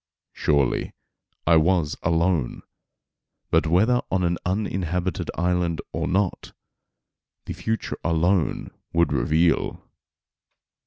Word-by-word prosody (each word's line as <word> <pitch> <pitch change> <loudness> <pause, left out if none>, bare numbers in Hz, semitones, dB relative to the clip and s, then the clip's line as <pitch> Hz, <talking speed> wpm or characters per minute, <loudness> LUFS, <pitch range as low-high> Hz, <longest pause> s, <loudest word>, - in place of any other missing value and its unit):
Surely 70 -4 0 0.5
I 85 0 +5
was 80 -2 +2
alone; 85 -4 0 0.9
but - - +3
whether 110 +9 +3
on 95 -1 0
an 85 0 0
uninhabited 90 -2 -2
island 90 -1 0
or - - -2
not, 95 0 -1 0.9
the - - -5
future 110 -1 -3
alone 85 +2 +1 0.2
would 85 -2 +2
reveal. 80 +2 +1
85 Hz, 95 wpm, -24 LUFS, 80-95 Hz, 0.9 s, I